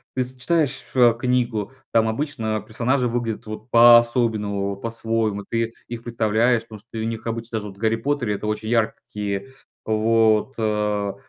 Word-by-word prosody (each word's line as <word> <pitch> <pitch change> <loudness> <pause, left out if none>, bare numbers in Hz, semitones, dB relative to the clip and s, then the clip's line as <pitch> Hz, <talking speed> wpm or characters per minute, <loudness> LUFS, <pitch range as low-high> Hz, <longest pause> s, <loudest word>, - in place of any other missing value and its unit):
ты 130 - +1
с 125 +1 -8
читаешь, 150 0 0
а, 120 -2 +6
книгу, 120 -3 -1 0.2
там 115 -1 +3
обычно, 110 -3 -2
а, - - -4
персонажи 125 +3 0
выглядят 115 -2 -3
вот 110 +2 -8
по-особенному, 115 -4 +5
вот - - -4
по-своему, 115 -3 -1
ты 115 0 -1 0.2
их 115 -1 -6
представляешь. 115 +1 +2
Потому 110 -2 -11
что 115 +2 -11
и - - -2
у 110 - -1
них 115 -1 -5
обычно 115 0 -3
даже 105 - -7
в 95 - -17
"Гарри 110 +1 +1
Поттере" 120 -3 -1
это 105 - -5
очень 105 +1 -3
яркие 110 0 -2 0.3
вот, 110 +2 +2
а. 105 -2 -1
115 Hz, 170 wpm, -22 LUFS, 110-120 Hz, 0.3 s, а